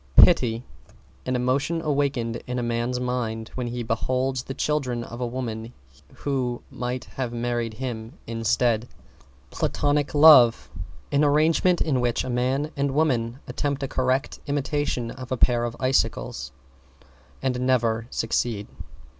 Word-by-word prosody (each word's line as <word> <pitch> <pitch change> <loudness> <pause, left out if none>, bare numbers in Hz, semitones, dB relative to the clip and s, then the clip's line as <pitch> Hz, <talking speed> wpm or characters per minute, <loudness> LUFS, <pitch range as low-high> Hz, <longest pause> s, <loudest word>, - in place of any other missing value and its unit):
=PITY= 120 - +6 0.6
An 130 - 0
emotion 135 +7 0
awakened 140 -7 0
in 125 0 -3
a 120 - -1
man's 120 +1 -1
mind 120 -3 -2
when 125 -2 -3
he 120 0 -3
beholds 130 +3 -1
the 135 +1 -7
children 130 -6 -1
of 120 +1 -8
a 125 - 0
woman 120 -2 -5 0.4
who 130 -4 -2
might 125 +1 -3
have 130 -3 -4
married 120 -1 -2
him 115 -2 -5
instead. 115 0 +1 0.6
=PLATONIC 145 0 0
LOVE= 145 -6 +7 0.4
An 145 +1 +3
arrangement 160 +4 +3
in 135 -6 +1
which 120 -1 0
a 130 - -4
man 130 +5 0
and 140 -1 -1
woman 130 -5 +1
attempt 140 -1 -2
a - - -1
correct 130 +2 -1
imitation 145 -4 -1
of 130 -1 -9
a 130 - 0
pair 120 0 +3
of 120 0 -4
icicles 100 - 0 0.9
and 130 -2 0
never 115 -3 +1
succeed. 115 -3 -1
125 Hz, 140 wpm, -25 LUFS, 120-135 Hz, 0.9 s, LOVE=